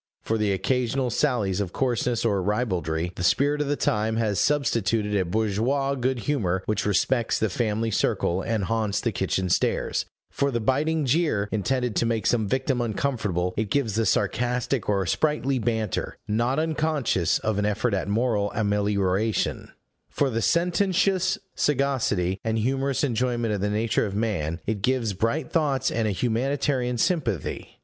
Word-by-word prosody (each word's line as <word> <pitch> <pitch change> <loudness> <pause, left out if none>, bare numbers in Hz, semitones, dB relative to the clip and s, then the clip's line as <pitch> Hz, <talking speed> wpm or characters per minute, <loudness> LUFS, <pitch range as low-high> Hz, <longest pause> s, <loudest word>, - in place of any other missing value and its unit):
For 110 0 -1
the 105 -1 +1
occasional 125 +5 0
sallies 105 -9 +1
of 95 -3 -4
coarseness 120 -2 0
or 100 -4 +2
ribaldry, 90 -6 -1
the 90 - -4
spirit 145 +10 +2
of 150 - -1
the 145 - +1
time 110 -3 0
has 110 -4 0
substituted 115 -7 +1
a 95 -2 +2
bourgeois 110 +8 0
good 130 -2 -1
humor 95 -10 0
which 105 -1 -1
respects 115 +3 +1
the 110 -3 0
family 110 +1 -1
circle, 90 -2 0
and 110 0 -1
haunts 105 -1 0
the 115 - -1
kitchen 95 -1 -1
stairs; - - 0 0.3
for 140 - 0
the 120 -3 -1
biting 145 +6 +1
jeer, 130 -7 +1
intended 120 +3 -1
to 115 - +2
make 115 -2 -1
some 110 -4 +2
victim 130 +1 0
uncomfortable, 105 -7 -1
it 105 -1 -1
gives 120 -3 0
the 110 0 +1
sarcastic 120 +5 0
or 100 -2 +1
sprightly 140 - 0
banter, 110 -2 -2
not 120 +6 0
unconscious 155 - +1
of 110 -2 -1
an 105 - +1
effort 105 +2 0
at 95 -2 -1
moral 105 -1 +1
amelioration; 105 0 0 0.4
for 140 -2 0
the 115 0 -1
sententious 185 - +2 0.2
sagacity, 125 -10 0
and 110 0 0
humorous 135 +4 0
enjoyment 120 -3 0
of 100 - -2
the 105 - 0
nature 110 +1 +1
of 100 - -5
man, 90 -7 -1
it 105 -2 -2
gives 120 -2 +1
bright 115 - -1
thoughts 140 -5 +1
and 115 -1 0
a - - +1
humanitarian 125 +3 0
sympathy. 125 - -1
115 Hz, 160 wpm, -25 LUFS, 105-130 Hz, 0.4 s, or